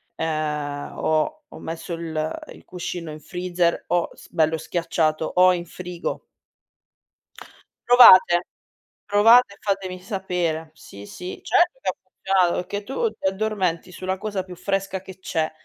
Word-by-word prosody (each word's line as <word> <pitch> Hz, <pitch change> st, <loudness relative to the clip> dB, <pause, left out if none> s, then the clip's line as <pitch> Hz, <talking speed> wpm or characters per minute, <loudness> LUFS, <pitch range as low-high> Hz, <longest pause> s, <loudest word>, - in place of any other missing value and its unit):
ehm, 150 Hz, -2 st, -3 dB
ho 160 Hz, -, +1 dB
ho -, -, -11 dB
messo 165 Hz, +2 st, -6 dB
il 160 Hz, -2 st, -3 dB
il -, -, -17 dB
cuscino 175 Hz, -2 st, -6 dB
in 155 Hz, -, -9 dB
freezer 175 Hz, -1 st, -1 dB
o 175 Hz, -1 st, +1 dB
s -, -, -16 dB
bello 160 Hz, -1 st, +2 dB
schiacciato 160 Hz, -1 st, -1 dB
o 185 Hz, 0 st, +6 dB
in 175 Hz, -1 st, -4 dB
frigo. 175 Hz, +1 st, -6 dB, 1.7 s
Provate, 185 Hz, -7 st, +8 dB, 0.6 s
provate 210 Hz, +2 st, +5 dB
e -, -, -18 dB
fatemi 190 Hz, -3 st, -2 dB
sapere. 180 Hz, -5 st, -3 dB
Sì, 100 Hz, -9 st, -12 dB
sì 180 Hz, -, -8 dB
certo 370 Hz, +5 st, +2 dB
che -, -, -1 dB
ha -, -, -2 dB
funzionato, 185 Hz, -3 st, +1 dB
perché 205 Hz, +3 st, -5 dB
tu 440 Hz, -, -1 dB
ti 190 Hz, -, -3 dB
addormenti 190 Hz, -3 st, -1 dB
sulla 185 Hz, +1 st, -3 dB
cosa 200 Hz, -2 st, -3 dB
più 180 Hz, -1 st, -10 dB
fresca 195 Hz, 0 st, -2 dB
che 190 Hz, -1 st, -12 dB
c'è, 160 Hz, -4 st, -2 dB
180 Hz, 140 wpm, -23 LUFS, 165-195 Hz, 1.7 s, Provate